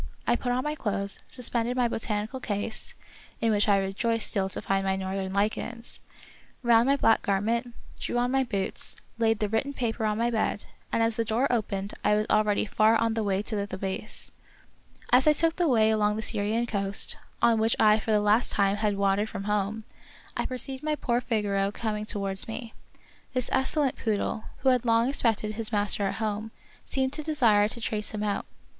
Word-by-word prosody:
I 240 Hz, -, +3 dB
put 245 Hz, +1 st, -2 dB
on 250 Hz, +1 st, 0 dB
my 300 Hz, 0 st, -1 dB
clothes, 200 Hz, -7 st, -2 dB
suspended 245 Hz, -1 st, -2 dB
my 245 Hz, -1 st, +3 dB
botanical 220 Hz, +2 st, -3 dB
case 210 Hz, -2 st, -3 dB, 0.2 s
— -, -, -24 dB
in 230 Hz, -1 st, +2 dB
which 210 Hz, 0 st, +2 dB
I 200 Hz, -, +5 dB
rejoiced 205 Hz, +4 st, 0 dB
still 190 Hz, -1 st, 0 dB
to -, -, -3 dB
find 195 Hz, 0 st, +1 dB
my 190 Hz, 0 st, +1 dB
northern 190 Hz, 0 st, -3 dB
lichens 220 Hz, +4 st, -2 dB, 0.3 s
— -, -, -28 dB
round 235 Hz, 0 st, +5 dB
my 275 Hz, -, +4 dB
black 225 Hz, -5 st, +3 dB
garment, 230 Hz, +4 st, -1 dB, 0.2 s
drew -, -, -2 dB
on 245 Hz, +1 st, +1 dB
my 270 Hz, 0 st, +3 dB
boots, 200 Hz, -6 st, -2 dB, 0.2 s
laid 225 Hz, -1 st, +3 dB
the 210 Hz, -, 0 dB
written 225 Hz, +7 st, -1 dB
paper 230 Hz, -3 st, -2 dB
on 210 Hz, 0 st, 0 dB
my 235 Hz, +1 st, +1 dB
bed, 220 Hz, -2 st, -1 dB, 0.3 s
and 230 Hz, -, +2 dB
as 225 Hz, -1 st, 0 dB
the 230 Hz, -, +2 dB
door 225 Hz, +4 st, +1 dB
opened 200 Hz, -3 st, -2 dB
I 210 Hz, -, +4 dB
was 210 Hz, 0 st, +1 dB
already 215 Hz, -1 st, +3 dB
far 215 Hz, +2 st, +3 dB
on 230 Hz, 0 st, +1 dB
the 225 Hz, -1 st, -1 dB
way 200 Hz, -1 st, 0 dB
to 215 Hz, -, -4 dB
the 200 Hz, -1 st, -2 dB
Thebais. 190 Hz, +2 st, -5 dB, 0.8 s
As 255 Hz, +4 st, +5 dB
I 305 Hz, -, +7 dB
took 330 Hz, +2 st, +3 dB
the 350 Hz, -2 st, +2 dB
way 220 Hz, -5 st, +4 dB
along 210 Hz, -1 st, +2 dB
the 220 Hz, -, -3 dB
Syrian 220 Hz, +2 st, 0 dB
coast, 200 Hz, -3 st, +1 dB, 0.2 s
on 230 Hz, -1 st, +4 dB
which 225 Hz, +1 st, +2 dB
I 215 Hz, 0 st, +5 dB
for 220 Hz, -, -7 dB
the 215 Hz, -1 st, +4 dB
last 210 Hz, +3 st, +3 dB
time 200 Hz, 0 st, +2 dB
had 210 Hz, -1 st, 0 dB
wandered 200 Hz, +2 st, +1 dB
from 195 Hz, -, -5 dB
home, 210 Hz, +1 st, -1 dB, 0.5 s
I -, -, -1 dB
perceived 260 Hz, +1 st, -5 dB
my 305 Hz, 0 st, 0 dB
poor 245 Hz, -4 st, 0 dB
Figaro 205 Hz, -4 st, 0 dB
coming 210 Hz, -1 st, -3 dB
to 215 Hz, -, -3 dB
wards 195 Hz, -1 st, -3 dB
me. 225 Hz, 0 st, -6 dB, 0.6 s
This 255 Hz, -1 st, 0 dB
excellent 265 Hz, +1 st, +1 dB
poodle, 215 Hz, 0 st, -1 dB, 0.2 s
who 265 Hz, -, +5 dB
had 250 Hz, -2 st, +3 dB
long 230 Hz, +1 st, +3 dB
expected 225 Hz, -6 st, 0 dB
his 220 Hz, +1 st, -1 dB
master 205 Hz, -1 st, +1 dB
at -, -, -3 dB
home, 215 Hz, 0 st, -2 dB, 0.3 s
seemed 265 Hz, 0 st, -1 dB
to 310 Hz, -, -4 dB
desire 240 Hz, -10 st, +3 dB
to 235 Hz, -, -7 dB
trace 215 Hz, -1 st, -2 dB
him 210 Hz, -, -2 dB
out. 205 Hz, -1 st, -2 dB
220 Hz, 205 wpm, -27 LUFS, 205-235 Hz, 0.8 s, I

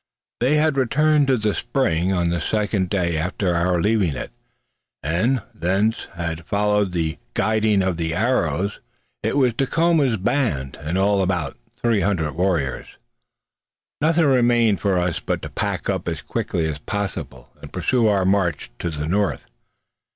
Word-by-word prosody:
They 130 Hz, +5 st, +3 dB
had 150 Hz, -2 st, +2 dB
returned 150 Hz, +3 st, +3 dB
to 130 Hz, -2 st, +3 dB
the 105 Hz, -2 st, 0 dB
spring 95 Hz, -8 st, 0 dB
on 85 Hz, -2 st, +1 dB
the 85 Hz, 0 st, -1 dB
second 105 Hz, -3 st, 0 dB
day 85 Hz, -5 st, 0 dB
after 90 Hz, +2 st, -1 dB
our 85 Hz, +1 st, +1 dB
leaving 100 Hz, -6 st, +1 dB
it, -, -, -6 dB, 0.7 s
and 100 Hz, -, +1 dB
thence 95 Hz, +7 st, 0 dB
had 85 Hz, -1 st, -4 dB
followed 105 Hz, +1 st, +1 dB
the 80 Hz, -3 st, -2 dB, 0.2 s
guiding 110 Hz, -2 st, +2 dB
of 95 Hz, -3 st, -1 dB
the 80 Hz, 0 st, -2 dB
arrows. 100 Hz, -, 0 dB, 0.4 s
It -, -, -1 dB
was 130 Hz, -4 st, +3 dB
Dacoma's 145 Hz, -1 st, +2 dB
band, 90 Hz, -, -1 dB
in 80 Hz, +5 st, -2 dB
all 100 Hz, +1 st, +3 dB
about 90 Hz, -1 st, -1 dB, 0.2 s
three 115 Hz, -4 st, +1 dB
hundred 85 Hz, -7 st, 0 dB
warriors. 85 Hz, -7 st, -1 dB, 1.0 s
Nothing 160 Hz, +2 st, +3 dB
remained 120 Hz, -5 st, +3 dB
for 100 Hz, -3 st, +1 dB
us 90 Hz, -1 st, 0 dB
now -, -, -20 dB
but -, -, -1 dB
to -, -, -5 dB
pack -, -, -3 dB
up -, -, -2 dB
as -, -, -2 dB
quickly 80 Hz, -2 st, -2 dB
as 75 Hz, -2 st, -4 dB
possible, 75 Hz, -10 st, -5 dB
and -, -, -10 dB
pursue 120 Hz, -3 st, +1 dB
our 100 Hz, -3 st, +2 dB
march 95 Hz, -9 st, +1 dB
to 85 Hz, -, -2 dB
the 75 Hz, -2 st, -4 dB
north. 100 Hz, +5 st, 0 dB
100 Hz, 160 wpm, -22 LUFS, 85-115 Hz, 1.0 s, They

